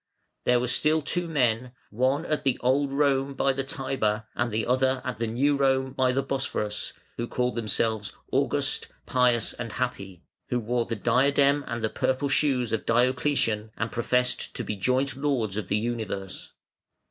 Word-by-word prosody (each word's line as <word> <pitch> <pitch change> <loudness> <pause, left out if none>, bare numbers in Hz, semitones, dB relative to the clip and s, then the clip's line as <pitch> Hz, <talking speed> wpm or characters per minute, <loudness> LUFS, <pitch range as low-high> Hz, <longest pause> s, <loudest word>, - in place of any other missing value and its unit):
There 125 0 +4
were 125 - 0
still 150 +5 +2
two 175 +3 -1
men, 125 -5 +1 0.2
one 130 +7 +1
at 150 -1 -1
the 135 -3 +1
Old 135 +3 +2
Rome 140 -1 +1
by 135 0 +2
the 135 +1 -2
Tiber, 130 -6 -1
and 120 -1 -1
the 110 +1 -1
other 130 +1 +2
at 125 -4 -4
the 115 - 0
New 135 +6 +2
Rome 135 -1 +1
by 130 -1 +2
the 135 +2 0
Bosphorus, 130 -6 -2 0.2
who 120 - -2
called 125 +1 -1
themselves 110 -3 -1 0.2
August, - - +1 0.2
Pious, 125 -2 +2
and 115 -2 -6
Happy, 100 -8 -4 0.3
who 125 - +1
wore 120 +1 -1
the 115 - -2
diadem 140 +5 +3
and 115 -1 -4
the - - +3
purple 130 +5 0
shoes 135 -4 +2
of 110 - -2
Diocletian, 120 -2 +1
and 115 0 -2
professed 125 +1 0
to - - -2
be 105 - -3
joint 130 +6 0
lords 130 -8 -1
of 105 -3 -3
the - - +1
universe. 110 -4 -4
125 Hz, 170 wpm, -26 LUFS, 115-135 Hz, 0.3 s, There